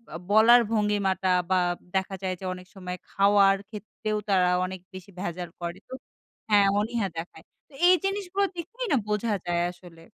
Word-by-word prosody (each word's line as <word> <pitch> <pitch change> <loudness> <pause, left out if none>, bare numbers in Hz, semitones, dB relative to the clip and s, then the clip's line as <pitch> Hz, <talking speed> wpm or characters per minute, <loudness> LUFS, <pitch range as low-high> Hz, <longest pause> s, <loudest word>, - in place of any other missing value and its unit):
আ - - -3
বলার 230 +3 +7
ভঙ্গিমাটা 200 -3 +1 0.2
বা - - +4 0.4
দেখা 190 0 -1
যায় 185 -1 -1
যে 190 - -8
অনেক 180 0 -11
সময় 180 -1 -6
খাওয়ার 195 0 +4
ক্ষেত্রেও 215 0 -5
তারা 180 -2 +3 0.2
অনেক 185 0 -6
বেশি 185 +1 -10
ভেজাল 175 -2 -4
করে। 170 +1 -4
তো - - -9 0.6
হ্যাঁ, 205 -1 +5
অনীহা 225 -1 -1
দেখায়। 165 -1 -7 0.3
তো - - -23
এই 365 - +7
জিনিসগুলো 395 0 -1
দেখলেই 465 +9 -5
না - - +4
বোঝা 210 +1 0
যায় 175 0 0
আসলে। 175 -2 -16
195 Hz, 165 wpm, -26 LUFS, 185-220 Hz, 0.6 s, বলার